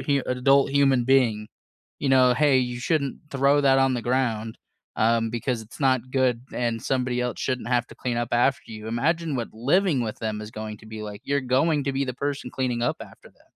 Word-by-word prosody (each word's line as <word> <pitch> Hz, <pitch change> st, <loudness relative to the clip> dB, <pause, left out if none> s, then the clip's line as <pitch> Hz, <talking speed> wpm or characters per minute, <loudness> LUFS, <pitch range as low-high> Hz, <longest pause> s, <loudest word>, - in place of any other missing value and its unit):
hu 140 Hz, -2 st, 0 dB
adult 135 Hz, +2 st, +3 dB
human 135 Hz, -3 st, +3 dB
being, 120 Hz, -5 st, +2 dB, 0.5 s
you 140 Hz, -, -1 dB
know, 130 Hz, -1 st, +5 dB
"Hey 145 Hz, -2 st, +4 dB
you 125 Hz, -1 st, -2 dB
shouldn't 140 Hz, -2 st, -1 dB
throw 140 Hz, +1 st, +3 dB
that 135 Hz, -1 st, +4 dB
on 135 Hz, -1 st, +3 dB
the 120 Hz, -, -3 dB
ground, 115 Hz, -3 st, -1 dB, 0.4 s
um, 115 Hz, 0 st, +2 dB
because 120 Hz, 0 st, -2 dB
it's 110 Hz, -, -14 dB
not 130 Hz, -2 st, +1 dB
good, 130 Hz, -3 st, +1 dB
and 115 Hz, -2 st, -2 dB
somebody 125 Hz, -2 st, -1 dB
el 125 Hz, -1 st, -2 dB
shouldn't 125 Hz, -3 st, -3 dB
have 120 Hz, -1 st, +1 dB
to -, -, -12 dB
clean 125 Hz, -2 st, -3 dB
up 120 Hz, 0 st, -1 dB
after 120 Hz, 0 st, +1 dB
you." 110 Hz, 0 st, -8 dB
Imagine 155 Hz, +5 st, 0 dB
what 120 Hz, -, -4 dB
living 145 Hz, -, +2 dB
with 110 Hz, -2 st, -4 dB
them 110 Hz, -1 st, -3 dB
is 105 Hz, -, -8 dB
going 110 Hz, -1 st, -7 dB
to 110 Hz, -, -16 dB
be 110 Hz, 0 st, -7 dB
like, 105 Hz, -1 st, -7 dB
you're 140 Hz, 0 st, 0 dB
going 140 Hz, +3 st, +1 dB
to 140 Hz, -, -1 dB
be 135 Hz, +1 st, 0 dB
the 125 Hz, -2 st, -4 dB
person 140 Hz, -2 st, -4 dB
cleaning 125 Hz, -2 st, -2 dB
up 120 Hz, -, 0 dB
after -, -, -13 dB
them. -, -, -29 dB
125 Hz, 215 wpm, -25 LUFS, 115-135 Hz, 0.5 s, know